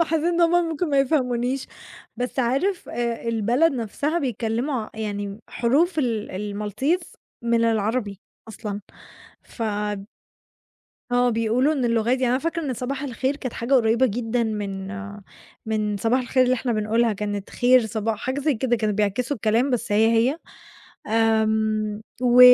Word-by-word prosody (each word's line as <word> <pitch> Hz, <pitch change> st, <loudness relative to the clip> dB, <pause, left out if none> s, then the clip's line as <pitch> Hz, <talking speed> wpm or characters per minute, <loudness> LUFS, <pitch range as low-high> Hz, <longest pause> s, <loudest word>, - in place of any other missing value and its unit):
ما -, -, +5 dB
حسّيت 320 Hz, 0 st, -1 dB
إن 345 Hz, 0 st, +1 dB
هُم 335 Hz, -1 st, +5 dB, 0.2 s
ممكن 325 Hz, +1 st, -2 dB
ما 280 Hz, -, +3 dB
يفهمونيش، 255 Hz, -2 st, +1 dB, 0.5 s
بس 245 Hz, +3 st, -4 dB
عارف 275 Hz, +10 st, 0 dB
آآ 235 Hz, -1 st, -2 dB
البلد 235 Hz, +8 st, +2 dB
نَفْسها 275 Hz, +7 st, -1 dB
بيتكلموا 245 Hz, +1 st, -1 dB
ع -, -, -9 dB
يعني 205 Hz, -1 st, -4 dB
حروف 310 Hz, +9 st, +1 dB
ال 230 Hz, -6 st, 0 dB, 0.3 s
الMaltese 260 Hz, -, -1 dB, 0.4 s
من 235 Hz, 0 st, +2 dB
العربي 220 Hz, -2 st, 0 dB, 0.3 s
أصلًا، 210 Hz, -1 st, -5 dB, 0.6 s
ف 230 Hz, -, -8 dB, 1.5 s
آه 245 Hz, 0 st, +3 dB
بيقولوا 230 Hz, +6 st, +2 dB
إن 265 Hz, -5 st, -1 dB
اللغة 230 Hz, -2 st, +2 dB
ده 235 Hz, -, +1 dB
يعني 260 Hz, 0 st, +2 dB
أنا 250 Hz, +2 st, +2 dB
فاكرة 330 Hz, +3 st, -2 dB
إن 265 Hz, -4 st, -2 dB
صباح 265 Hz, +3 st, -4 dB
الخير 270 Hz, +1 st, -1 dB
كانت 255 Hz, -5 st, -5 dB
حاجة 240 Hz, +4 st, 0 dB
قريبة 235 Hz, +1 st, +4 dB
جدًا 235 Hz, +2 st, -1 dB
من 200 Hz, -3 st, -3 dB, 0.8 s
من 215 Hz, -2 st, 0 dB
صباح 230 Hz, +6 st, +1 dB
الخير 255 Hz, +1 st, +2 dB
اللي 250 Hz, -, +3 dB
إحنا 245 Hz, -1 st, -1 dB
بنقولها 220 Hz, +2 st, +1 dB
كانت 205 Hz, -1 st, -4 dB
خير 245 Hz, -2 st, +4 dB
صباح 220 Hz, 0 st, -2 dB
حاجة 260 Hz, +4 st, -2 dB
زي 295 Hz, 0 st, +1 dB
كده 240 Hz, +1 st, +1 dB
كانوا 215 Hz, -2 st, 0 dB
بيعكسوا 225 Hz, +7 st, 0 dB
الكلام 225 Hz, +6 st, +1 dB
بس 235 Hz, -4 st, -1 dB
هي، 220 Hz, +2 st, +4 dB
هي، 240 Hz, +7 st, +3 dB, 0.7 s
آمم، 220 Hz, -1 st, +1 dB, 0.2 s
و 245 Hz, 0 st, +5 dB
235 Hz, 155 wpm, -23 LUFS, 220-265 Hz, 1.5 s, ما